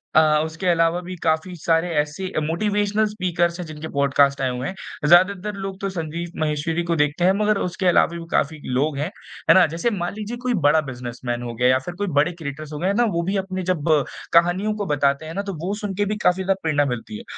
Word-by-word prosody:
अ, 155 Hz, -1 st, +5 dB
उसके 165 Hz, +4 st, -5 dB
अलावा 165 Hz, 0 st, +3 dB
भी 185 Hz, +1 st, -7 dB
काफ़ी 160 Hz, +3 st, 0 dB
सारे 165 Hz, +1 st, +1 dB
ऐसे 150 Hz, +5 st, -2 dB, 0.2 s
मोटिवेशनल 205 Hz, +4 st, +1 dB
स्पीकर्स 175 Hz, -4 st, -1 dB
हैं 180 Hz, -, -4 dB
जिनके 155 Hz, 0 st, -7 dB
पॉडकास्ट 140 Hz, 0 st, +3 dB
आए 130 Hz, -, +1 dB
हुए 125 Hz, +1 st, -3 dB
हैं 190 Hz, -5 st, -6 dB
ज़्यादातर 185 Hz, +4 st, +4 dB
लोग 195 Hz, 0 st, -5 dB
तो 195 Hz, -, -1 dB
संदीप 170 Hz, -1 st, -5 dB
माहेश्वरी 155 Hz, +2 st, -1 dB
को 170 Hz, -, +2 dB
देखते 150 Hz, +3 st, +1 dB
हैं 185 Hz, -, +6 dB
मगर 210 Hz, -1 st, +2 dB
उसके 180 Hz, +1 st, -3 dB
अलावा 175 Hz, -, +5 dB
भी 170 Hz, -, -7 dB
काफ़ी 155 Hz, +2 st, 0 dB
लोग 140 Hz, +3 st, +1 dB
हैं। 150 Hz, +4 st, -2 dB, 0.4 s
है -, -, +10 dB
ना? 185 Hz, -, +7 dB
जैसे 165 Hz, +9 st, -1 dB
मान 175 Hz, -4 st, -3 dB
लीजिए 215 Hz, +3 st, -5 dB
कोई 250 Hz, -1 st, +1 dB
बड़ा 150 Hz, +2 st, +5 dB
बिज़नेसमैन 120 Hz, -1 st, -5 dB
हो 120 Hz, -1 st, -5 dB
गया 125 Hz, +2 st, +2 dB
या 130 Hz, 0 st, +4 dB
फिर 175 Hz, -, -5 dB
कोई 205 Hz, -, 0 dB
बड़े 150 Hz, +4 st, +4 dB
क्रिएटर्स 155 Hz, -2 st, -7 dB
हो 150 Hz, -, -5 dB
गए 180 Hz, -, 0 dB
हैं 195 Hz, -, +2 dB
ना, 240 Hz, -, +3 dB
वो 185 Hz, -7 st, 0 dB
भी 200 Hz, -, 0 dB
अपने 190 Hz, -1 st, -3 dB
जब 165 Hz, -5 st, -2 dB, 0.5 s
कहानियों 175 Hz, +5 st, +3 dB
को 205 Hz, -1 st, -3 dB
बताते 140 Hz, -1 st, +1 dB
हैं 160 Hz, -, -7 dB
ना, 200 Hz, -, -2 dB
तो 200 Hz, -1 st, -5 dB
वो 195 Hz, -, -1 dB
सुनके 205 Hz, -1 st, -2 dB
भी 210 Hz, +1 st, -1 dB
काफ़ी 180 Hz, +1 st, +3 dB
ज़्यादा 195 Hz, +1 st, +2 dB
प्रेरणा 150 Hz, -3 st, +2 dB
मिलती 120 Hz, -5 st, -4 dB
है। -, -, -10 dB
170 Hz, 230 wpm, -22 LUFS, 150-190 Hz, 0.5 s, है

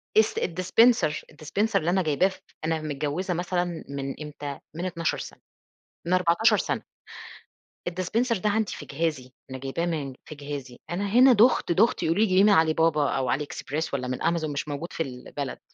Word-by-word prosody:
dis 220 Hz, 0 st, +4 dB
الdispenser 185 Hz, +1 st, +3 dB, 0.2 s
الdispenser 180 Hz, +9 st, 0 dB
اللي 165 Hz, -, -1 dB
أنا 190 Hz, +1 st, +2 dB
جايباه 155 Hz, +4 st, +3 dB
ف 190 Hz, -, -8 dB, 0.3 s
أنا 160 Hz, -1 st, 0 dB
متجوّزة 155 Hz, +5 st, -2 dB
مثلًا 175 Hz, +1 st, 0 dB, 0.3 s
من 140 Hz, -1 st, -4 dB
إمتى، 145 Hz, -2 st, -6 dB, 0.2 s
من 175 Hz, +3 st, -3 dB
12 170 Hz, -2 st, -1 dB
سنة، -, -, -9 dB, 0.7 s
من 180 Hz, -, +1 dB
14 180 Hz, +4 st, +4 dB
سنة -, -, -2 dB, 1.1 s
الdispenser 215 Hz, +7 st, 0 dB
ده 210 Hz, +2 st, +1 dB
عندي 215 Hz, 0 st, 0 dB
في -, -, -8 dB
جهازي 140 Hz, -4 st, -2 dB, 0.2 s
أنا 130 Hz, -, -5 dB
جايباه 135 Hz, +6 st, -3 dB
من 145 Hz, -6 st, -3 dB
في 155 Hz, -, -9 dB
جهازي، 140 Hz, -3 st, -7 dB
أنا 180 Hz, +4 st, -2 dB
هنا 255 Hz, +4 st, +7 dB
دُخت 230 Hz, -3 st, +4 dB
دُخت 210 Hz, +7 st, +3 dB
يقولوا 165 Hz, +6 st, +2 dB
لي -, -, +6 dB
جيبيه 185 Hz, +1 st, +5 dB
من 210 Hz, -, +6 dB
علي 160 Hz, -5 st, +5 dB
بابا 155 Hz, -3 st, +2 dB
أو 130 Hz, -2 st, 0 dB
Ali 135 Hz, -, -1 dB
Express 150 Hz, +1 st, -4 dB
والَّا 130 Hz, -2 st, -2 dB
من 125 Hz, 0 st, -3 dB
Amazon 165 Hz, -1 st, +1 dB
مش 145 Hz, +1 st, -3 dB
موجود 145 Hz, +4 st, -5 dB
في 165 Hz, -, -1 dB
البلد، 135 Hz, +1 st, -6 dB
165 Hz, 185 wpm, -26 LUFS, 145-185 Hz, 1.1 s, هنا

